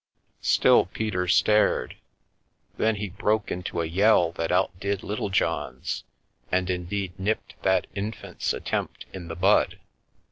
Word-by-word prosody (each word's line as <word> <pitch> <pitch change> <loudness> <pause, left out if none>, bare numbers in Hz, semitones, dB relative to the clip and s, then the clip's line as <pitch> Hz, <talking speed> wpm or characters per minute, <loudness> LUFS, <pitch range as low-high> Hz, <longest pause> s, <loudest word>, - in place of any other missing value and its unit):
Still - - +5
Peter 95 -2 -2
stared 105 -8 +3 0.4
— - - -41
then 110 0 +2
he 105 -1 -4
broke 105 +3 0
into 90 -1 -3
a - - -1
yell 90 0 +4
that 85 -1 -3
out 95 +2 +2
did 100 0 -2
Little 105 0 -3
John's, 75 -8 -1 0.5
and, 90 0 +1
indeed, 90 +1 -3
nipped 105 +3 -2
that 95 -1 +2
infant's 105 +3 -3
at - - -5
tempt - - -3
in 90 -3 -7
the 80 - -5
bud. 95 +4 +3
95 Hz, 145 wpm, -26 LUFS, 90-105 Hz, 0.5 s, Still